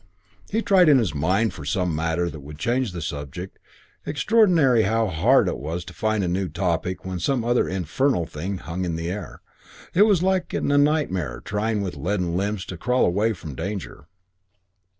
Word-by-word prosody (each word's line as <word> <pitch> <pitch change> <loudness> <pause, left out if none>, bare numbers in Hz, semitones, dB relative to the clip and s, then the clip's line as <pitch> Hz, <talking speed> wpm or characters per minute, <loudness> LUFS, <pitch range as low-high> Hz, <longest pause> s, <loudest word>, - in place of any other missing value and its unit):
He 225 +2 0
tried 185 -4 +5
in 145 - +7
his 110 - 0
mind 95 +10 +1
for 75 - -9
some 90 +2 -1
matter 80 +2 0
that 80 -2 -6
would 75 +2 -10
change 120 - 0
the 85 -2 -5
subject. 75 +6 -6 0.4
Extraordinary 160 - +3
how 110 +2 +1
hard 100 +11 +3
it - - -2
was 80 +5 -4
to - - -10
find 110 -2 0
a - - 0
new 90 +1 -1
topic 90 0 -2
when 95 -1 -4
some 120 +7 0
other 120 +1 +2
infernal 95 - 0
thing 90 +6 -5
hung 90 +2 -5
in 85 -2 -2
the 85 +1 -3
air. 95 -6 -7 0.5
It 205 +4 +6
was 190 -5 +3
like, 185 -2 0
in - - 0
a 145 - +4
nightmare, 120 - +1
trying 105 0 -1
with 95 - -4
leaden 90 +2 -1
limbs 100 +1 -1
to 90 - -7
crawl 125 +8 +2
away 105 +6 +1
from 80 -6 -8
danger. 90 -1 -6
95 Hz, 190 wpm, -24 LUFS, 85-120 Hz, 0.5 s, in